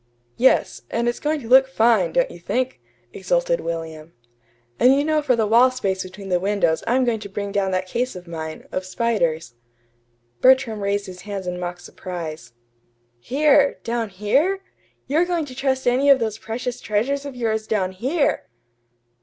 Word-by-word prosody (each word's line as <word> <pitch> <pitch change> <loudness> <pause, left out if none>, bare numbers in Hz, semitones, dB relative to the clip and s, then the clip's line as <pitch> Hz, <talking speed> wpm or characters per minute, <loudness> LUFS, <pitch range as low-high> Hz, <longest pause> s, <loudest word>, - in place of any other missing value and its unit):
"Yes; 260 +2 +3
and 235 +1 -1
it's 240 - -1
going 300 0 -1
to 230 - -9
look 265 +2 +6
fine; 240 - +3
don't - - +2
you - - -11
think?" 255 +1 -2 0.3
exulted - - 0
William. 165 -1 -6 0.7
"And 255 +2 +6
you 285 - +2
know 310 0 +2
for 265 -4 +2
the 225 -2 +1
wall 235 +4 +5
space 195 -7 -2
between 195 +1 -9
the 180 -1 +2
windows 185 -4 +1
I'm 255 +2 +2
going 230 -2 0
to 200 - -8
bring 200 +1 -4
down 200 -1 0
that 185 0 -1
case 245 +6 -2
of 180 -1 -10
mine, 160 -1 -7
of 185 - -2
spiders." 180 - -1 0.9
Bertram 255 -5 +4
raised 200 0 -1
his 185 -2 -10
hands 200 -1 -6
in 180 0 -4
mock 175 0 -5
surprise. 170 -4 -7 0.7
"Here 280 - +3
down 230 -2 -2
here! 280 - 0 0.4
You're 310 +5 +2
going 350 -3 -1
to 260 - -10
trust 265 0 -1
any 260 +3 +3
of 275 - +8
those 220 -3 -3
precious 245 +2 -5
treasures 250 +7 -1
of 280 -2 -7
yours 220 -2 -2
down 195 -4 0
here!" 265 - -1
225 Hz, 175 wpm, -22 LUFS, 185-265 Hz, 0.9 s, of